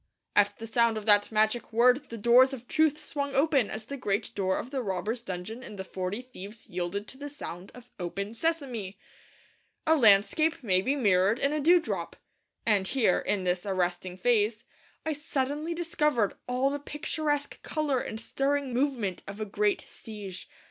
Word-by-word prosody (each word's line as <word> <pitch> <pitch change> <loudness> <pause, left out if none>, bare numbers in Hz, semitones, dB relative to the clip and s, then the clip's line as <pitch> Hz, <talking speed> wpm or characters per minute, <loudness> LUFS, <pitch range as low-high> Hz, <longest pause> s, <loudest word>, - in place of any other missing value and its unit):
at 205 0 +4
the 225 - -7
sound 230 0 +2
of 215 - -5
that 205 -1 +4
magic 220 +2 +1
word 250 +5 +4
the 230 - -6
doors 245 +5 +6
of 250 -2 -8
truth 310 -2 +3
swung 280 -2 -4
open 275 -5 +3
as 215 0 -5
the 280 - -5
great 205 -5 -1
door 190 -2 0
of 250 - -5
the 270 -2 -1
robbers' 215 +3 -2
dungeon 195 +3 -6
in 215 - -9
The 190 - -5
Forty 190 +5 -4
Thieves 220 -3 -10
yielded 180 +4 -3
to 265 - -11
the 290 0 -5
sound 190 -10 -8
of 245 -1 -13
'Open, 200 +4 -4
Sesame!' 250 - -2 0.9
A 320 - +5
landscape 235 +6 +4
may 185 -4 +3
be 270 +8 +1
mirrored 200 -4 +3
in 280 +3 +1
a 305 - 0
dewdrop; 340 +3 +2 0.5
and 205 -4 +2
here, 225 -7 +3
in 200 -2 0
this 180 0 0
arresting 180 -2 -1
phrase, 220 0 +2 0.4
I 315 - 0
suddenly 295 +2 -2
discovered 300 - +1
all 255 +2 +1
the 285 - -2
picturesque 295 0 -2
colour 300 -4 0
and 220 - -5
stirring 275 +2 -1
movement 240 -8 0
of 200 +2 -7
a 215 - -2
great 205 0 +1
siege. 205 -4 -9
230 Hz, 175 wpm, -28 LUFS, 200-280 Hz, 0.9 s, doors